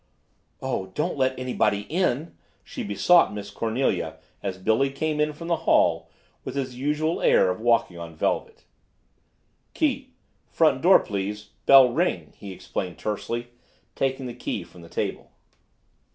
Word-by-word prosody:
"Oh, 95 - -2
don't 160 +4 -1
let 130 -1 0
anybody 115 -5 0
in!" 160 - -1 0.3
she - - -7
besought 165 - +4
Miss 105 0 -7
Cornelia 115 +5 -1 0.2
as 95 - -4
Billy 110 +8 +2
came 150 +2 -2
in 150 0 +2
from 165 +3 -9
the 170 -1 +1
hall 80 -1 +3 0.3
with - - -6
his 130 -2 -2
usual 150 +5 -1
air 95 - +4
of 90 - -5
walking 115 -7 +2
on 85 -1 -8
velvet. - - -2 1.1
"Key, - - 0 0.4
front - - +2
door - - +7
please 105 +1 -4 0.2
bell 135 -3 +8
ring," 175 +7 -1
he 100 -2 -9
explained 95 -1 -5
tersely, 115 +3 -3 0.4
taking 135 -1 -1
the 120 - -5
key 115 -5 -4
from 85 +1 -16
the 85 - -13
table. - - -4
120 Hz, 145 wpm, -25 LUFS, 100-140 Hz, 1.1 s, bell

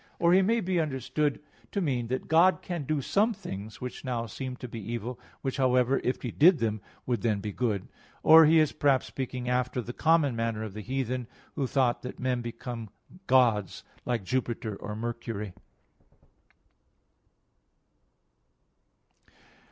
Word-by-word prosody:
Or 170 +1 +4
he 190 - +6
may 225 +4 +2
be 185 -2 0
understood 145 0 -1 0.3
to 200 - -1
mean 130 -9 -1
that 130 +2 -3
God 170 +4 +4
can 170 -5 -4
do 150 -1 -1
some 215 - +2
things 100 - -7
which 125 0 -6
now 120 -3 -2
seem 130 +4 -5
to 125 - -8
be 115 -1 -7
evil: 120 +3 -5 0.2
which, 135 -1 -2
however, 130 0 +3
if 125 - -1
He 120 - -3
did 170 - +6
them, 110 -4 -1 0.2
would 120 -5 -1
then 110 -3 +1
be 105 +1 -4
good. 105 -3 -1 0.4
Or 160 0 +9
he 165 +1 +5
is, 155 -2 +4
perhaps, 140 -3 +2
speaking 125 -2 -5
after 125 0 0
the 120 0 -5
common 155 -5 +3
manner 115 -1 -1
of 110 -3 -6
the 105 - -6
heathen, 130 0 -2 0.3
who 140 -3 -1
thought 125 -2 +1
that 125 - -7
men 125 -1 0
became 120 -1 -6 0.4
gods, 115 -7 +3 0.2
like 120 -4 -1
Jupiter 115 -1 -2
or 105 +1 -6
Mercury. 115 -3 -4
125 Hz, 155 wpm, -28 LUFS, 115-145 Hz, 0.4 s, Or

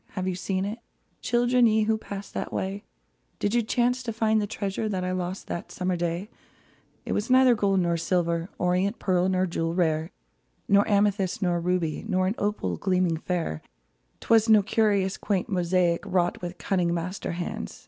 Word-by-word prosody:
Have 185 -1 -3
you 185 - 0
seen 185 +1 -2
it, 215 +4 -4 0.4
Children, 240 0 +3
ye 220 0 +3
who 220 +1 +2
passed 200 -2 -7
that - - -4
way? 195 +2 -3 0.5
Did 205 - -1
you 240 - +3
chance 245 +2 +1
to 240 -2 -4
find 220 -1 +1
the 205 - -2
treasure 205 0 -3
That 185 -3 -2
I 185 - -1
lost 185 +1 -3
that 170 - -6
summer 180 0 -1
day? 170 +3 -2 0.8
It - - -4
was 210 +4 -2
neither 255 -1 +6
gold 200 -4 +2
nor 170 -1 +1
silver. 170 0 0
Orient 180 +4 +1
pearl 185 -1 +1
nor 185 0 +2
jewel 165 -1 -2
rare; 160 -2 +1 0.6
Neither 200 +1 +4
amethyst 200 -2 +1
nor 175 -1 +1
ruby, 170 -2 -1
Nor 185 -3 +1
an 190 - +1
opal 200 - -1
gleaming 180 -3 +1
fair; 165 - -3 0.6
'Twas 225 0 +3
no 215 -2 +6
curious, 200 -3 +1
quaint 200 -3 -1
mosaic 180 -2 +1
Wrought 175 -1 +1
by 175 0 -4
cunning 175 0 0
master 180 +2 -4
hands. 170 - -5
185 Hz, 180 wpm, -26 LUFS, 175-210 Hz, 0.8 s, neither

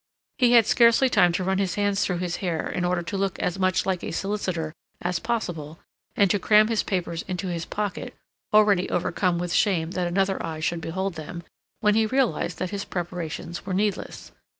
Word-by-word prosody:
He 245 -2 +5
had 230 -3 +7
scarcely 235 +4 +5
time 180 -7 +4
to 185 - -1
run 190 +1 0
his 190 -2 0
hands 205 -1 +1
through 180 - -1
his 175 0 -2
hair 170 -4 -2
in 180 - -2
order 175 0 0
to 195 +4 -4
look 195 -1 -1
as 180 +2 -2
much 185 0 +2
like 185 -2 -1
a - - -3
solicitor 180 -4 -2 0.3
as 175 -1 -1
possible, 175 -9 -3 0.4
and 200 - +4
to 205 - +2
cram 215 +2 +5
his 225 -2 +2
papers 170 -3 -2
into 185 0 -3
his 170 -1 -3
pocket, 205 -3 -4 0.4
already 210 -3 +4
overcome 180 0 0
with 175 0 -2
shame 175 -6 +2
that 180 -2 -1
another 195 +2 0
eye 160 -1 -4
should 165 +1 -1
behold 190 +4 -3
them, 165 +2 -7 0.4
when 210 -1 +4
he 220 0 +3
realized 220 - 0
that 185 - -3
his 200 -1 -3
preparations 170 -1 -5
were 185 -1 -3
needless. 205 0 -2
185 Hz, 195 wpm, -25 LUFS, 175-205 Hz, 0.4 s, had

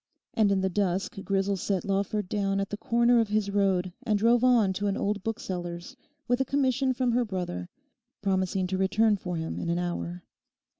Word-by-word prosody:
And 215 -3 +3
in 195 -1 +2
the 190 - +1
dusk 195 +4 -1
Grisel 195 0 0
set 190 0 -1
Lawford 200 0 -1
down 195 0 0
at 195 - -3
the 205 - -3
corner 235 +2 +3
of 225 - +2
his 205 -1 0
road 190 -3 +1
and 220 -5 +1
drove 230 +3 +3
on 235 -6 +4
to 200 +2 -2
an 200 - 0
old 205 0 -1
bookseller's 180 -1 -5 0.3
with 245 +1 +2
a - - +4
commission 265 -1 +1
from 255 -1 0
her 245 +1 +2
brother, 180 - -4 0.5
promising 190 -1 0
to 185 +1 -2
return 210 +3 +3
for 180 -3 -5
him 160 0 -4
in 170 - -3
an 170 - +1
hour. 175 0 -3
200 Hz, 195 wpm, -28 LUFS, 185-225 Hz, 0.5 s, on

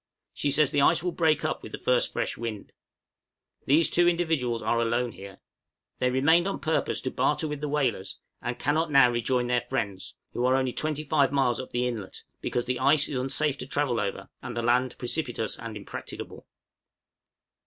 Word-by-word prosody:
She 145 - -1
says 150 0 +3
the 145 - +2
ice 160 +3 +4
will 180 - 0
break 160 -3 +1
up - - -2
with - - -10
the - - -3
first - - +1
fresh - - -2
wind. 110 -3 -6 1.0
These 155 +4 +5
two 175 0 +3
individuals 160 -9 0
are 115 - +1
alone 120 +1 0
here. 95 0 -11 0.6
They 125 - +2
remained 160 +8 +3
on 195 - -2
purpose 160 -1 0
to 130 - -3
barter 155 +1 +1
with 150 -1 -5
the 150 - -2
whalers, 120 -10 -1 0.2
and 120 0 -3
cannot 155 +3 0
now 135 -4 +6
rejoin 120 +1 0
their 120 0 +1
friends, 110 -7 -4 0.2
who 120 - -2
are 130 - +3
only 130 -2 0
25 150 -2 0
miles 135 -4 +1
up 130 - -6
the 125 +1 0
inlet, 110 -6 -6 0.2
because 120 - -2
the 125 -1 -2
ice 140 +3 +4
is 135 - -2
unsafe 135 +2 0
to 125 - -4
travel 135 -5 0
over 100 -1 -3
and - - -6
the 120 - -1
land 125 +2 +1
precipitous 120 -4 -1
and 115 -2 -6
impracticable. 100 - -8
130 Hz, 185 wpm, -27 LUFS, 120-150 Hz, 1.0 s, now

